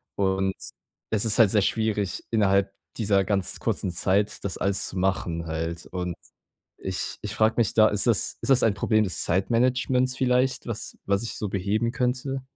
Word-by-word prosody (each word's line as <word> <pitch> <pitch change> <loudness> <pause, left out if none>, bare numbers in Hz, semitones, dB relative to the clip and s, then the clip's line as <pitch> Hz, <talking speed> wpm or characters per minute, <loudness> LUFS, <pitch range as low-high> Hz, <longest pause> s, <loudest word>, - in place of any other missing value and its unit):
und 95 0 0 0.6
es 110 0 +1
ist 110 +1 +3
halt 110 -4 +6
sehr 105 - +3
schwierig, 105 -2 -1
innerhalb 100 -3 +2 0.3
dieser 100 -3 +2
ganz 100 -3 -1
kurzen 95 - -2
Zeit, 95 +4 0
das 100 - -3
alles 95 0 0
zu 95 - -7
machen 90 -3 -1
halt. 80 +1 -4
Und 90 -1 -4 0.6
ich 95 -1 -4
ich 105 +1 -5
frage 110 0 +2
mich 115 -4 +2
da, 110 -1 +6
ist 105 +3 0
das 115 -4 +1
ist - - -3
das 135 -1 +5
ein 110 -3 +3
Problem 110 +2 +2
des 95 - -1
Zeitmanagements 125 +6 +1
vielleicht, 125 0 +1
was 115 -2 -5
was 100 +1 +1
ich 115 - -5
so 105 - -3
beheben 105 +4 -1
könnte? 130 +2 -2
105 Hz, 175 wpm, -25 LUFS, 95-115 Hz, 0.6 s, halt